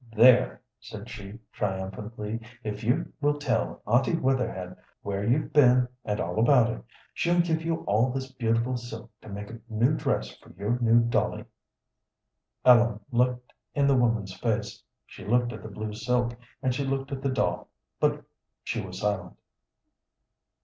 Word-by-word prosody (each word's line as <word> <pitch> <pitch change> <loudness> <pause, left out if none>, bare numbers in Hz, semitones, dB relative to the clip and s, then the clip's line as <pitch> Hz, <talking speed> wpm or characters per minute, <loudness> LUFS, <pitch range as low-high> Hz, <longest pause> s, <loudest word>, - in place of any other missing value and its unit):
"There!" 125 +3 +6 0.2
said - - -9
she, 100 +2 -8
triumphantly, 105 +3 -4 0.2
"if 105 -1 -4
you 120 +4 0
will 145 0 +2
tell 140 -6 -1
Aunty 120 +9 +3
Wetherhed 120 - -1 0.3
where 100 0 -2
you've 125 +8 +1
been, 125 -3 +6 0.2
and 105 0 -2
all - - -2
about 120 -1 +5
it, - - -9 0.3
she'll 175 +1 +1
give 165 -2 +2
you 165 0 -2
all 110 +5 +2
this 130 +1 -4
beautiful 120 0 0
silk 120 -2 -8
to 110 - -12
make 100 +1 -6
a 115 - -9
new 115 +6 +2
dress 60 - -1
for - - -17
your 105 +5 -1
new 115 0 +5
dolly." 120 0 0 1.2
Ellen 120 -3 +6
looked 125 0 0 0.2
in 140 -1 +3
the 140 -1 +4
woman's 115 -6 +1
face, 110 +1 -2 0.2
she - - -12
looked 120 +2 +1
at - - -8
the 110 - -8
blue 105 +1 -5
silk, 120 +2 0 0.3
and 130 - +2
she 140 - -1
looked 135 0 -2
at 135 -1 -4
the 135 - 0
doll, 130 - 0 0.3
but - - +1 0.4
she 115 - -2
was 95 0 -7
silent. 95 -4 -2
120 Hz, 160 wpm, -27 LUFS, 105-130 Hz, 1.2 s, There